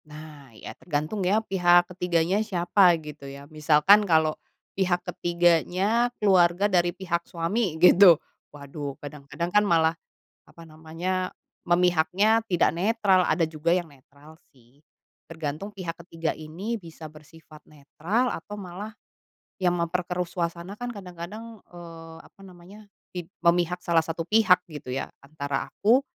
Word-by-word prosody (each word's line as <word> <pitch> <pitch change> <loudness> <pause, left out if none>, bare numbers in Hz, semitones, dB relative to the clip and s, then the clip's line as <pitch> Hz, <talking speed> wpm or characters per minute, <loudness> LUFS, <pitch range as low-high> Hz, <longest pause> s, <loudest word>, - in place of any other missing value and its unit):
Nah, 150 -2 -12
ya - - -9
tergantung 155 +5 -3
ya, 205 +4 +1
pihak 175 -2 +4
ketiganya 180 +2 0
siapa 180 -3 +3
gitu 150 -3 -10
ya, 140 +1 -10
misalkan 155 +6 +5
kalau 160 -1 +3 0.4
pihak 180 -2 0
ketiganya 175 +7 +1
keluarga 185 -2 +3
dari 175 -4 +2
pihak 175 -2 -3
suami 175 +1 -2
gitu. 180 0 +7 0.3
Waduh, 140 -1 -8
kadang-kadang 150 +4 -7
kan 210 0 +5
malah 165 -2 +3 0.5
apa 170 - -16
namanya, 165 +4 -4 0.3
memihaknya 180 +5 +2
tidak 175 -5 +2
netral, 195 -1 +2
ada 175 - +1
juga 160 +2 0
yang 175 -3 -2
netral 145 +3 -19 0.2
sih, 125 +1 -26 0.5
tergantung 160 +5 -6
pihak 175 -4 -6
ketiga 165 -2 -3
ini 180 +10 -5
bisa 165 -4 -11
bersifat 155 0 -17
netral 170 - -2
atau 205 +5 -7
malah, 205 +2 -8 0.6
yang 180 -2 +1
memperkeruh 180 +1 -2
suasana, 170 +2 -4
kan 245 +1 -5
kadang-kadang 200 +3 -10
eee, 165 -2 -12
apa - - -21
namanya, 190 +3 -15 0.3
pid 175 0 -7
memihak 175 0 +1
salah 165 -2 +2
1 165 +1 -5
pihak 215 -4 +4
gitu 145 -5 -8
ya, 135 - -3 0.2
antara 140 -1 -4
aku 240 +6 +3
175 Hz, 135 wpm, -25 LUFS, 160-190 Hz, 0.6 s, gitu